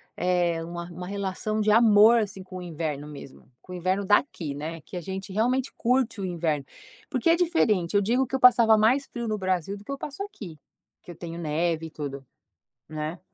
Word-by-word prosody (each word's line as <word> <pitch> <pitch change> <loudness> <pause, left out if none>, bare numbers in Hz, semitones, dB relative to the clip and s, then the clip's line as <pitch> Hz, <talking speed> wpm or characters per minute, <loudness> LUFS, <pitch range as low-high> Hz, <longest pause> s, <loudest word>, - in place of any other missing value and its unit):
é 175 -2 +1
uma 170 +1 -6
uma 180 +1 -7
relação 200 +2 -2
de 215 - +1
amor, 220 +1 +6
assim, 195 -2 -5
com 185 0 -9
o - - -6
inverno 155 -4 -4
mesmo, 140 -2 -11
com 185 - -14
o - - -5
inverno 185 +3 0
daqui 190 - +1
né, 160 +3 -6
que 180 - -9
a - - -4
gente 190 +3 -6
realmente 250 +6 0
curte 250 -2 +1
o 195 - -2
inverno. 160 -5 -1 0.4
Porque 270 +2 +1
é 330 - +6
diferente, 225 - +1
eu 200 - +5
digo 240 +6 +2
que 265 - -4
eu - - 0
passava 235 -3 +6
mais 245 +6 +3
frio 235 -3 -6
no 215 -1 -1
Brasil 185 0 -1
do 200 - -14
que 245 - -8
eu 275 - -3
passo 295 +7 -6
aqui, 205 - -9 0.4
porque - - -12
eu - - -11
tenho 170 0 -7
neve 165 +1 -1
e - - -14
tudo, 140 -3 -6 0.6
né. 155 +2 -5
190 Hz, 210 wpm, -26 LUFS, 165-225 Hz, 0.6 s, amor